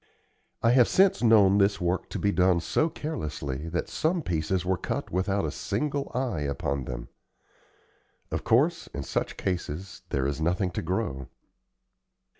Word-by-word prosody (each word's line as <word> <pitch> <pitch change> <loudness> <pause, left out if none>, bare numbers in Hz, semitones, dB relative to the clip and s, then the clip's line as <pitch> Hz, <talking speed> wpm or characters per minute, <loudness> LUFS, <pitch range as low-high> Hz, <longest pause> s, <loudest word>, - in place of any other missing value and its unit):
I 115 - +5
have 125 -1 +6
since 195 0 +4
known 105 -4 +6
this 100 +1 +3
work 90 +1 -1
to - - -4
be 100 - +1
done 90 -2 +3
so 155 - +1
carelessly 75 - -4
that 85 +1 -2
some 165 +1 0
pieces 85 0 -1
were 95 +1 +2
cut - - -4
without 95 +1 0
a 75 - -2
single 145 - -2
eye 125 -9 -1
upon 70 -2 -2
them. - - -6 1.2
Of - - -2
course, 155 +9 +2
in - - -3
such - - -2
cases 90 0 -4
there 65 -1 0
is 70 +2 -2
nothing 90 +3 +1
to - - -3
grow. 80 - -2
95 Hz, 155 wpm, -27 LUFS, 80-115 Hz, 1.2 s, have